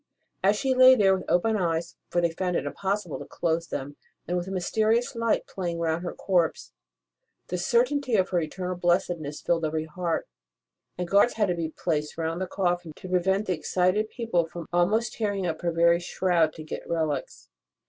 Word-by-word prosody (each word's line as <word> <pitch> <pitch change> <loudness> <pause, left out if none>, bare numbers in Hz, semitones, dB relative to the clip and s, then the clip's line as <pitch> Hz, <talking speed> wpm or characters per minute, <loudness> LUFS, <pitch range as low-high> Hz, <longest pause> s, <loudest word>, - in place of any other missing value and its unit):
As 200 +2 +4
she 265 +4 +1
lay 255 0 +8
there 195 -4 +4
with 185 - -6
open 220 +5 +2
eyes 170 -3 -1
for 175 - +1
they 170 - +2
had 165 - -13
found 180 -2 0
it - - -1
impossible 195 -4 -2
to - - -7
close 165 0 -1
them 145 +2 -5 0.3
and 180 - -1
with 175 0 -2
a - - -5
mysterious 220 +7 +1
light 230 -1 +1
playing 175 -3 -4
round 165 0 0
her 175 - -5
corpse, 175 -4 0 0.8
the - - -1
certainty 290 - +2
of 190 -2 +2
her 180 - +1
eternal 180 +3 -4
blessedness 175 -4 0
filled 165 -1 +1
every 155 0 -1
heart, 165 +1 -2 0.7
and 180 -1 -3
guards 200 +6 +4
had 210 -4 +1
at 175 - -2
last - - -2
to - - -1
be 155 - -14
placed 150 -3 -2
round 165 +2 -2
the 185 - -1
coffin 175 -4 -1
to 185 - -10
prevent 190 +3 +1
the 185 - 0
excited 185 +5 +1
people 225 -9 0
from 170 0 -8
almost 215 +6 +2
tearing 205 -4 -1
up 160 -2 -3
her 175 -1 0
very 170 +1 +4
shroud 175 -2 +1
to 155 - -9
get 155 - -7
relics. 155 - -2
180 Hz, 200 wpm, -26 LUFS, 165-200 Hz, 0.8 s, lay